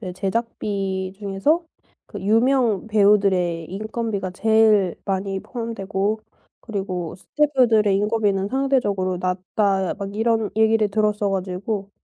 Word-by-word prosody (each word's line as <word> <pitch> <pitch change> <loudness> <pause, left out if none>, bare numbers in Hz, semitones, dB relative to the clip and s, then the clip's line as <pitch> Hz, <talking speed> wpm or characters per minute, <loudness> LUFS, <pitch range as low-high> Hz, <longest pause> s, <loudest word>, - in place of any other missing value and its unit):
그 185 -4 -6
제작비 195 -2 -2
중에서 205 - +1 0.4
그 205 - -8
유명 230 0 +2
배우들의 195 -6 +2
인건비가 215 -1 -4
제일 215 -2 +3
많이 195 0 -2
포함되고 215 -3 -3 0.4
그리고 190 -6 -4
스태프들의 235 -5 +2
인건비는 205 -1 +1
상대적으로 205 -9 0
낮다 190 +1 0
막 200 +1 -6
이런 225 -1 +1
얘기를 220 -1 +3
들었어 210 0 +1
가지고 195 +2 -3
205 Hz, 285 characters per minute, -22 LUFS, 190-220 Hz, 0.4 s, 제일